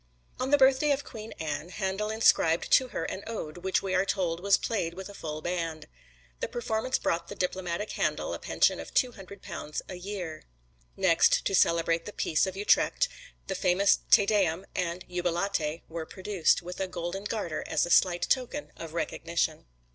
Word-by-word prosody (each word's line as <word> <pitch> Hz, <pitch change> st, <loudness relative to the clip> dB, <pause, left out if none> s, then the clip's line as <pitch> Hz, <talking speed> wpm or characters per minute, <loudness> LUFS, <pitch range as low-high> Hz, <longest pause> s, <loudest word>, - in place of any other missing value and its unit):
On 255 Hz, -, -1 dB
the 290 Hz, -, +6 dB
birthday 270 Hz, +2 st, +5 dB
of 285 Hz, 0 st, +1 dB
Queen 220 Hz, 0 st, -9 dB
Anne, 155 Hz, +1 st, -4 dB
Handel 195 Hz, +2 st, -2 dB
inscribed 175 Hz, -6 st, +3 dB
to 260 Hz, -, +6 dB
her 165 Hz, -, -4 dB
an 190 Hz, +4 st, -4 dB
ode, 180 Hz, -8 st, -5 dB
which 190 Hz, +2 st, 0 dB
we 190 Hz, -1 st, -2 dB
are 185 Hz, 0 st, +3 dB
told 180 Hz, -4 st, -1 dB
was 200 Hz, +2 st, +4 dB
played 170 Hz, -7 st, -2 dB
with 190 Hz, +1 st, -7 dB
a -, -, -9 dB
full 155 Hz, -4 st, -6 dB
band. 165 Hz, -3 st, -3 dB, 0.5 s
The -, -, -2 dB
performance 240 Hz, +2 st, -1 dB
brought 170 Hz, 0 st, -1 dB
the -, -, -7 dB
diplomatic 180 Hz, +2 st, -2 dB
Handel -, -, -1 dB
a -, -, -4 dB
pension -, -, +2 dB
of -, -, -9 dB
two 250 Hz, -, +3 dB
hundred 200 Hz, -2 st, -12 dB
pounds 160 Hz, -5 st, -5 dB
a -, -, -7 dB
year. 180 Hz, -3 st, -6 dB, 0.6 s
Next, -, -, +4 dB
to -, -, 0 dB
celebrate 170 Hz, -2 st, +3 dB
the 210 Hz, -, -7 dB
peace 160 Hz, +4 st, +1 dB
of 190 Hz, 0 st, -5 dB
Utrecht, 205 Hz, -, +3 dB, 0.4 s
the -, -, -3 dB
famous 190 Hz, +2 st, +3 dB
"Te 200 Hz, -, +7 dB
Deum" 195 Hz, -4 st, +1 dB
and 180 Hz, 0 st, -2 dB
"Jubilate" 175 Hz, -2 st, -1 dB
were 160 Hz, -1 st, -6 dB
produced, 190 Hz, -3 st, +1 dB
with 180 Hz, +1 st, -7 dB
a 190 Hz, -, -1 dB
golden 180 Hz, +3 st, -5 dB
garter 190 Hz, -8 st, -3 dB
as -, -, +1 dB
a 175 Hz, -, -5 dB
slight 175 Hz, -1 st, +4 dB
token 260 Hz, +3 st, -1 dB
of 165 Hz, -1 st, -8 dB
recognition. 165 Hz, -2 st, -2 dB
185 Hz, 185 wpm, -29 LUFS, 170-205 Hz, 0.6 s, Te